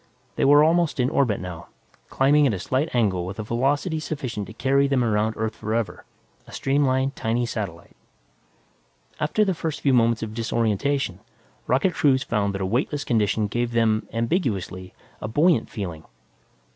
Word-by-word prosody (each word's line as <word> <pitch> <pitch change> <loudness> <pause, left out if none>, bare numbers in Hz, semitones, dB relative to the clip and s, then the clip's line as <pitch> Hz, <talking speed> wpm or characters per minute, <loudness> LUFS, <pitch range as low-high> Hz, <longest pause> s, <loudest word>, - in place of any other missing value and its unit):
They - - +1
were 145 +2 +7
almost 165 -2 +2
in 125 +1 +2
orbit, 120 -7 +1
now, 90 -3 -7 0.4
climbing 145 +2 +4
at 110 - 0
a - - -5
slight 130 - -1
angle 100 -7 +1
with 95 +2 -6
a 110 - -3
velocity 140 - 0
sufficient 130 -9 -4
to 110 - -10
carry 140 +3 +2
them 135 -3 +1
around 110 -1 +1
Earth 110 0 -2
forever, 110 +1 -3 0.4
a - - -13
streamlined, 135 -1 +1
tiny 115 +2 -1
satellite. 100 -8 -6 1.2
After 190 +8 +1
the 190 - +1
first 160 -2 -4
few 140 - +2
moments 115 -2 +3
of 110 -1 -5
disorientation, 115 +4 -1 0.5
rocket 140 +9 +2
crews 140 -4 +2
found 100 -2 -1
that 95 - -4
a - - 0
weightless 135 +8 -1
condition 110 -4 +1
gave 120 +3 -2
them, 110 -2 +1
ambiguously, 115 - -2 0.3
a - - -3
buoyant 145 +2 +2
feeling. 85 -7 -6
120 Hz, 160 wpm, -24 LUFS, 110-140 Hz, 1.2 s, were